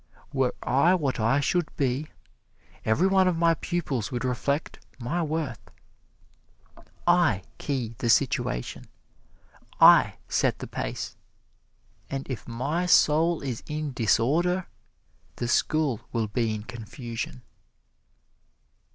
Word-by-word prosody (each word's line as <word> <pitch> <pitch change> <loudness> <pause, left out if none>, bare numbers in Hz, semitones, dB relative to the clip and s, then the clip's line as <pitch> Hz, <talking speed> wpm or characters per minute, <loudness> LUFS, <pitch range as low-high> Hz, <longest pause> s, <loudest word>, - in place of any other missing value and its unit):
Were 135 -2 +1
I 150 +9 +4
what 140 -8 -1
I 115 +6 +3
should 175 +2 0
be, 135 +2 0 0.8
every 110 +12 +2
one 190 -1 +4
of 180 -2 +1
my 165 0 +4
pupils 155 - -3
would 125 0 -2
reflect 140 +4 -2
my 130 +8 -2
worth. 155 -7 -3 1.4
I 175 - +3 0.2
key 125 -6 -2
the 120 - -1
situation, - - +1 0.9
I - - +7
set - - +1
the - - -6
pace, - - -5 0.9
and 135 0 -4
if 125 - -6
my 145 +10 -2
soul 165 0 +4
is 130 -5 -4
in 150 -2 -3
disorder, 165 - +2 0.7
the 120 - -3
school 145 -1 +1
will 115 -1 0
be 115 +2 0
in 105 - -6
confusion." 115 - -7
135 Hz, 115 wpm, -26 LUFS, 120-165 Hz, 1.4 s, I